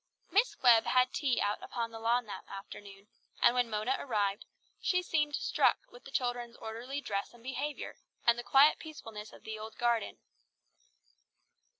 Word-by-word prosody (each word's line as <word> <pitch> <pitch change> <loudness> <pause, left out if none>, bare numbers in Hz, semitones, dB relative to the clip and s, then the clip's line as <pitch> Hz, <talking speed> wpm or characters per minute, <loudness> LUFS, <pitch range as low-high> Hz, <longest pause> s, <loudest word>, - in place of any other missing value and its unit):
Miss 420 +6 +3
Webb 235 -3 +7
had 255 0 +3
tea 270 -5 +1
out 205 +1 0
upon 230 -1 -4
the 225 - -8
lawn 235 +2 +2
that 210 - -7
afternoon, 195 0 -10 0.3
and - - +6
when 245 -1 +1
Mona 215 +5 0
arrived, 205 -5 -1 0.4
she 360 -1 +1
seemed 295 -4 +1
struck - - +3
with 245 - -15
the - - -9
children's 245 -2 -2
orderly 245 +6 -5
dress 200 -1 -3
and 235 - -18
behaviour, 275 +3 -4 0.3
and 235 - +6
the - - -4
quiet 275 +4 +6
peacefulness 225 -9 -9
of - - -15
the 220 0 -6
old 220 +1 -8
garden. 235 -1 0
240 Hz, 165 wpm, -32 LUFS, 220-265 Hz, 0.4 s, Webb